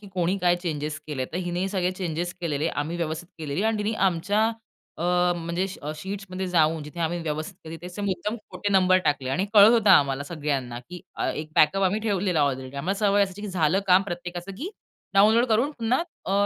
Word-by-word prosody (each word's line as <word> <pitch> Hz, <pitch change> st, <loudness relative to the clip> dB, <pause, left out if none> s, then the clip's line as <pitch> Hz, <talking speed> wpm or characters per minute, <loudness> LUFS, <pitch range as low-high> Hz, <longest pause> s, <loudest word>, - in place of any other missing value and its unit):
की 205 Hz, -, -12 dB
कोणी 180 Hz, +2 st, +1 dB
काय 175 Hz, -1 st, +3 dB
चेंजेस 155 Hz, -3 st, -3 dB
केले 135 Hz, -4 st, -3 dB
तर -, -, -2 dB
हिने 175 Hz, +2 st, -1 dB
सगळे 185 Hz, -2 st, 0 dB
चेंजेस 175 Hz, -1 st, -3 dB
केलेले 155 Hz, -2 st, -1 dB, 0.2 s
आम्ही 165 Hz, +3 st, -4 dB
व्यवस्थित 165 Hz, +1 st, -3 dB
केलेली 155 Hz, +4 st, -2 dB
आणि 220 Hz, -1 st, +1 dB
तिने 210 Hz, +1 st, -1 dB, 0.2 s
आमच्या 200 Hz, +5 st, +1 dB, 0.5 s
अ, -, -, -3 dB, 0.3 s
म्हणजे 170 Hz, +2 st, -2 dB, 0.2 s
अ, 150 Hz, +1 st, -3 dB
श 155 Hz, -, -11 dB
शीट्समध्ये 190 Hz, -1 st, -5 dB
जाऊन 160 Hz, -2 st, +2 dB
जिथे 150 Hz, +4 st, -8 dB
आम्ही 170 Hz, +1 st, 0 dB
व्यवस्थित 155 Hz, +4 st, -4 dB
केले 160 Hz, +1 st, -7 dB
त्याचे 180 Hz, +5 st, -8 dB
मुद्दाम 205 Hz, +3 st, -2 dB
खोटे 205 Hz, -, -3 dB
नंबर 185 Hz, -1 st, +5 dB
टाकले 145 Hz, -4 st, 0 dB
आणि 185 Hz, +8 st, 0 dB
कळत 205 Hz, +1 st, +9 dB
होतं 220 Hz, -4 st, +4 dB
आम्हाला 140 Hz, -6 st, +5 dB
सगळ्यांना 140 Hz, -6 st, -3 dB
की 180 Hz, 0 st, -8 dB, 0.2 s
अ, -, -, -1 dB
एक 155 Hz, 0 st, -5 dB
बॅकअप 195 Hz, +6 st, +4 dB
आम्ही 195 Hz, +3 st, +2 dB
ठेवलेला 195 Hz, -6 st, 0 dB
ऑलरेडी 130 Hz, -1 st, -2 dB
आम्हाला 185 Hz, +8 st, -2 dB
सवय 205 Hz, -1 st, +3 dB
असायची 200 Hz, +1 st, -4 dB
की 210 Hz, -, -4 dB
झालं 180 Hz, +1 st, +2 dB
काम 185 Hz, +1 st, +6 dB
प्रत्येकाचं 175 Hz, 0 st, -6 dB
की 335 Hz, +9 st, -4 dB, 0.4 s
डाउनलोड 220 Hz, +4 st, +6 dB
करून 235 Hz, +5 st, +2 dB
पुन्हा 240 Hz, +7 st, +1 dB, 0.2 s
अ, 190 Hz, -, -1 dB
180 Hz, 200 wpm, -25 LUFS, 155-200 Hz, 0.5 s, कळत